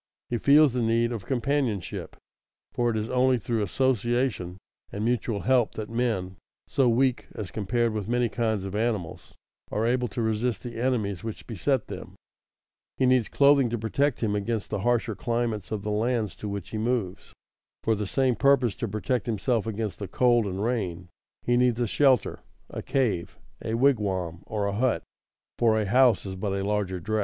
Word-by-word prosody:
He 120 - 0
feels 145 0 +6
the 125 - 0
need 115 +1 +2
of 110 -5 -5
companionship, 130 - -1 0.6
for 120 -1 +1
it 110 - -1
is 110 +1 -2
only 130 0 +3
through 115 -1 -2
association 120 -3 0 0.3
and 105 +2 -3
mutual 115 -3 0
help 125 -3 +2
that 110 0 -5
men, 110 -7 -1 0.3
so 130 -3 +2
weak 125 +1 +1
as 105 -4 -6
compared 115 +2 0
with 105 -2 -3
many 120 +1 +1
kinds 110 -3 -1
of 95 0 -5
animals, 105 -6 -3 0.4
are 110 - 0
able 125 +1 +1
to 115 +2 -4
resist 110 -1 -1
the 120 -1 -6
enemies 110 -7 -1
which 110 -2 -6
beset 125 +3 0
them. - - -9 0.8
He 130 - +2
needs 125 -3 +3
clothing 140 -3 +4
to 120 - -2
protect 135 +6 0
him 105 -3 0
against 105 +1 -2
the 105 - -1
harsher 120 +2 +1
climates 115 -3 -2
of 105 -2 -3
the 105 - -2
lands 110 -2 0
to 105 - -5
which 100 -2 -5
he 110 - -4
moves. 110 -5 -2 0.5
For 110 - +2
the 105 -2 -2
same 130 +2 +1
purpose, 135 -5 +3
to 115 - -2
protect 110 +5 -2
himself 115 0 0
against 110 -2 -3
the 100 - -4
cold 120 +2 +3
and 95 +1 -3
rain, 90 -8 -2 0.3
he 120 0 +2
needs 125 -1 +2
a 120 - +2
shelter, 130 0 +2 0.3
a - - -5
cave, 115 -11 -1 0.3
a 110 - -1
wigwam, 100 -10 +1
or 105 -2 -2
a 100 - -1
hut; 115 -4 +1 0.6
for 110 -2 +4
a 105 - 0
house 125 +3 +4
is 95 -1 -5
but 95 +1 -2
a 100 0 -1
larger 100 -2 -1
dress. 110 +4 -1
115 Hz, 185 wpm, -26 LUFS, 105-125 Hz, 0.8 s, feels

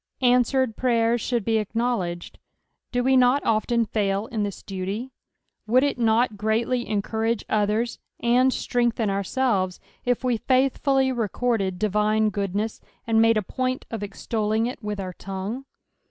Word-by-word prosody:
Answered 250 -1 +3
prryers 235 -2 +2
should 240 -5 -1
be 225 -1 +2
acknowledged. 210 -5 -2 0.5
Do 245 0 0
we 265 +1 +3
not 255 +2 +4
often 230 +1 +2
fail 200 -1 0
in 225 -2 -3
this 205 -2 -4
duty! 195 +6 -4 0.6
Would 250 +4 +4
it 285 -3 0
not 225 -1 +2
greatly 230 +4 0
encourage 220 +2 -1
others, 215 +3 0 0.2
nnd 250 +2 +4
strengthen 235 -4 0
ourselves, 195 -2 0 0.2
if 245 +1 0
we 250 -2 +1
faithfully 265 +2 +2
recorded 225 -4 -1
divine 215 +2 +2
goodness, 200 +2 -2 0.2
and 225 -1 +3
made 225 0 +4
a 215 - 0
point 255 +5 -2
of 225 -2 -4
extolling 215 +2 -1
it 245 -1 -5
with 210 -1 -3
our 185 -2 -4
tongue 195 +9 -5
225 Hz, 140 wpm, -24 LUFS, 210-245 Hz, 0.6 s, not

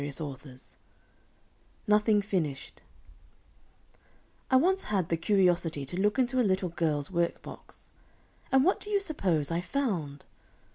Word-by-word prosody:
NOTHING 210 0 +3
FINISHED 165 -9 -3 1.7
I 260 - +3
once 375 +8 +3
had 195 -5 -1
the 165 - +2
curiosity 175 -5 +1
to 135 - -5
look 210 +4 +1
into 255 0 +1
a - - +5
little 190 -4 +1
girl's 155 -2 -1
work 170 -1 -1
box. - - -11 0.6
And 265 0 +5
what 375 +5 +2
do 420 - -6
you 410 -1 +2
suppose 180 - +1
I 170 +1 0
found? 175 - -3
190 Hz, 125 wpm, -29 LUFS, 165-250 Hz, 1.7 s, a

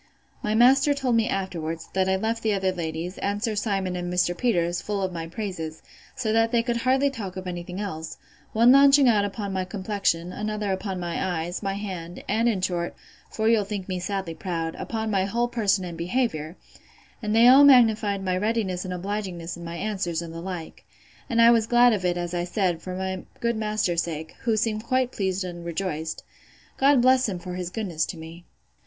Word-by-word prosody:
My 210 +1 -1
master 270 +5 +5
told 260 -4 0
me 225 -1 +2
afterwards, 165 -4 -3
that 190 0 +1
I 190 - +3
left 225 +4 -1
the 220 -1 +1
other 190 -1 +1
ladies, 170 0 -4
and 205 +1 -2
Sir 225 -2 0
Simon 195 -3 -1
and 175 0 -3
Mr. 175 0 +1
Peters, 175 -7 0
full 205 -2 -2
of 185 -1 -2
my 165 -1 -5
praises: 165 -4 -5 0.3
so 230 -5 -1
that 225 0 +3
they 235 -2 +2
could 240 -1 -1
hardly 265 +4 +2
talk 195 -8 -6
of 185 - -6
any 175 -1 -4
thing 180 +2 -7
else; 160 -6 -5 0.3
one 235 +3 +5
launching 275 0 +7
out 215 -4 +4
upon 200 -1 -4
my 190 -1 0
complexion, 185 -3 -1
another 210 -1 -2
upon 190 0 -3
my 175 -1 -2
eyes, 175 0 -2
my 195 -1 -2
hand, 180 -4 -6
and, 230 +3 +2
in 200 -5 -1
short, 175 -2 -2 0.3
for 220 0 -1
you'll 225 -2 +4
think 200 -2 -5
me 185 -2 -2
sadly 190 -2 -3
proud, 165 -1 -3
upon 220 -1 -3
my 190 -2 +2
whole 235 +4 0
person 205 -5 +1
and 170 -2 -7
behaviour; 170 -4 -1 0.6
and 215 -1 -1
they 230 +2 +7
all 265 +3 +9
magnified 220 -7 +5
my 185 -1 +1
readiness 200 -2 -1
and 180 -1 -4
obligingness 185 -3 -4
in 170 - -10
my 170 0 -6
answers, 185 -4 -2
and 165 -1 -8
the 165 - -6
like: 175 -3 -7 0.5
And 235 -2 +1
I 230 0 +8
was 225 -2 +3
glad 240 0 +5
of 200 -3 -2
it, 175 -1 +1
as 175 0 -3
I 175 0 -1
said, 180 -3 0
for 185 +1 -6
my 190 0 -3 0.2
good 235 0 0
master's 210 -6 0
sake, 160 -1 -5
who 225 -2 +2
seemed 215 -1 0
quite 255 +1 +1
pleased 190 -1 -1
and 175 -1 -7
rejoiced. 165 -2 -3 0.5
God 275 -2 +4
bless 255 -2 +4
him 185 - -3
for 180 +1 -7
his 180 -1 -4
goodness 180 -6 -2
to 175 - -6
me! 165 +2 -10
195 Hz, 210 wpm, -25 LUFS, 175-225 Hz, 0.6 s, all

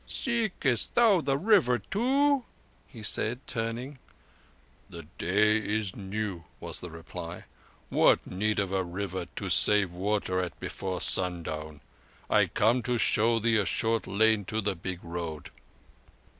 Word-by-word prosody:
"Seekest 215 - 0
thou 220 -7 +5
the 135 -2 0
River 185 - +4 0.2
also?" 275 +4 +3 0.6
said 110 +3 0
he, 135 - -28
turning. 120 +3 -4 0.9
"The 85 0 -9 0.2
day 105 +5 +3
is 105 -2 -2
new," 95 -3 -4
was - - -2
the 90 - -6
reply. 85 +1 -8 0.5
"What - - +4
need 105 +3 -1
of 100 -2 0
a 95 -1 +1
river 95 +1 -4 0.2
save 105 -3 +4
to 90 - -14
water 95 -1 0
at 90 -4 -4
before 95 -2 -4
sundown? 80 -4 -2 0.5
I - - +4
come 115 +4 +2
to 120 +2 -1
show 115 +1 +3
thee 115 0 +2
a 105 - +1
short 115 +7 0
lane 110 +1 +3
to 110 +4 -2
the 100 -2 -1
Big 90 +1 -6
Road." 85 -4 -6
105 Hz, 140 wpm, -28 LUFS, 90-120 Hz, 0.9 s, thou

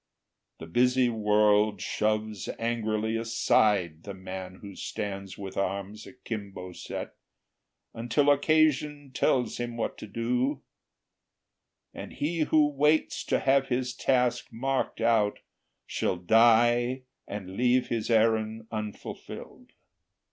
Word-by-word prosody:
The - - -9
busy 125 +7 +3
world 105 -1 +3
shoves 110 -1 -1
angrily 110 -1 -1
aside 105 -7 +2
The 100 +1 -8
man 95 0 -7
who 100 -2 -9
stands 100 -1 -5
with 95 -1 -7
arms 100 +2 -3
akimbo 100 -7 -7
set, - - -6 0.8
Until 120 +5 +2
occasion 150 -1 +2
tells 125 0 +1
him 120 -1 -4
what 115 - -3
to - - -8
do; 125 +6 -1 1.3
And - - -8
he 165 +3 -2
who 155 -1 +4
waits 150 +2 +1
to - - +1
have 135 0 +3
his 125 0 -1
task 125 -1 +1
marked 130 +1 -2
out 110 -3 +2 0.5
Shall - - -1
die 120 +5 +4 0.2
and 95 -2 -7
leave 125 +2 +2
his 115 -1 -2
errand 110 -1 +2
unfulfilled. 105 -2 -7
115 Hz, 110 wpm, -28 LUFS, 105-125 Hz, 1.3 s, who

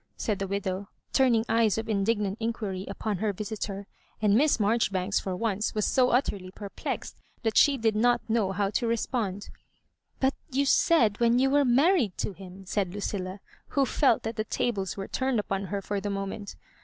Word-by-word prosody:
said 210 -3 -1
the 195 - -2
widow, 195 0 -3 0.2
turning 240 -4 +3
eyes 225 -2 +2
of 225 0 -3
indignant 205 -1 0
inquiry 210 -5 -3
upon 200 -1 -3
hct 210 -1 -1
visitor; 205 -1 -4 0.3
and 210 -2 +3
Miss 280 +4 +4
Marjoribanks 205 -3 +1
for 190 -2 -3
once 215 +1 -1
was 215 - +1
so 255 -2 +3
utterly 205 -7 0
perplexed 200 +1 -6 0.2
that 225 -2 0
she 285 -2 +5
did 225 -3 +1
not 240 +2 +3
know 220 -3 +2
^j?w 195 +1 -1
to 235 +2 0
respond. 225 -4 -2 0.3
" - - -46
But 265 +1 +2 0.2
you 280 +1 +1
said 250 -7 +3
when 235 0 +4
you 265 +1 +3
were 285 0 +4
married 265 - +3
to 205 - -2
him," 190 +1 -12
said 190 -1 -1
Lucilla, 195 -1 -4 0.3
who 275 -1 +1
felt 265 -3 +2
that 225 +1 -4
the 215 - 0
tables 205 -5 -2
were 195 - -4
turned 260 -3 0
upon 195 -1 -2
her 200 +1 -4
for 205 0 -2
the 205 - -3
moment. 195 +1 -4
210 Hz, 185 wpm, -28 LUFS, 195-235 Hz, 0.3 s, she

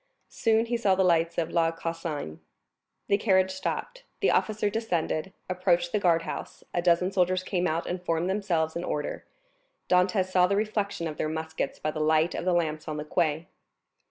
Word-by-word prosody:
Soon 225 0 +2
he 235 +1 -1
saw 200 -5 +3
the 190 - +2
lights 170 -2 +2
of 165 -1 -1
La 165 -1 +3
Consigne. 165 - -5 0.7
The 200 - +3
carriage 190 -3 +3
stopped, - - -4 0.2
the - - +3
officer 215 -1 +1
descended, 190 -5 -1 0.2
approached 180 -1 +1
the 210 - +1
guardhouse, 165 -3 -1
a 175 - +1
dozen 175 +1 +3
soldiers 185 -1 +1
came 180 -1 0
out 165 +2 -1
and 180 0 -3
formed 165 0 0
themselves 180 -5 0
in 170 - -3
order; 150 -4 -3 0.6
Dantès 185 +1 +2
saw 180 -1 +5
the 200 - +1
reflection 205 -4 -1
of 155 - -6
their 155 - -1
muskets 160 0 -3
by 155 - -2
the 155 - -5
light 155 +2 +3
of - - -4
the 185 - +2
lamps 155 -3 -1
on 155 -1 -3
the 150 - -4
quay. 160 0 0
175 Hz, 185 wpm, -27 LUFS, 165-190 Hz, 0.7 s, saw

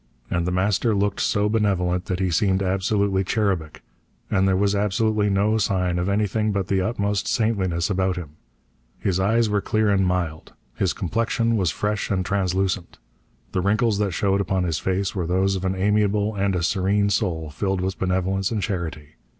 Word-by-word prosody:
And 85 0 0
The - - 0
Master 100 +4 +1
looked 100 0 0
so 105 0 +1
benevolent 95 -4 0
that 90 -3 -2
he 95 -2 0
seemed 95 +3 +2
absolutely 95 +1 +1
cherubic, 95 -6 -1 0.5
and 95 +1 +3
there 95 - +3
was 100 +1 +2
absolutely 105 +1 +1
no 105 +3 +2
sign 90 -3 0
of 90 +2 -1
anything 105 +1 0
but 100 -2 -2
the 95 -1 +2
utmost 100 -1 -1
saintliness 95 -7 0
about 95 -1 0
him. 85 -5 -6 0.7
His 95 -2 -1
eyes 110 +4 +2
were 105 -1 0
clear 110 0 +1
and 95 -1 +3
mild. 85 -4 -2 0.2
His 95 +6 0
complexion 115 +4 0
was 95 -6 +1
fresh 105 +5 -2
and 95 -2 0
translucent. 95 -1 -1 0.5
The 90 - 0
wrinkles 105 +2 +1
that 105 -1 +1
showed 95 +2 +1
upon 95 -2 0
his 85 -3 -1
face 95 +1 -1
were 90 -4 -2
those 95 +2 +1
of 95 0 -3
an 95 0 0
amiable 105 +2 +1
and 100 -1 0
a 90 - -1
serene 100 +3 +1
soul 80 -8 -1
filled 95 +5 -1
with 95 +1 -3
benevolence 95 +1 0
and 110 -4 -2
charity. 80 -5 -4
95 Hz, 180 wpm, -23 LUFS, 90-105 Hz, 0.7 s, and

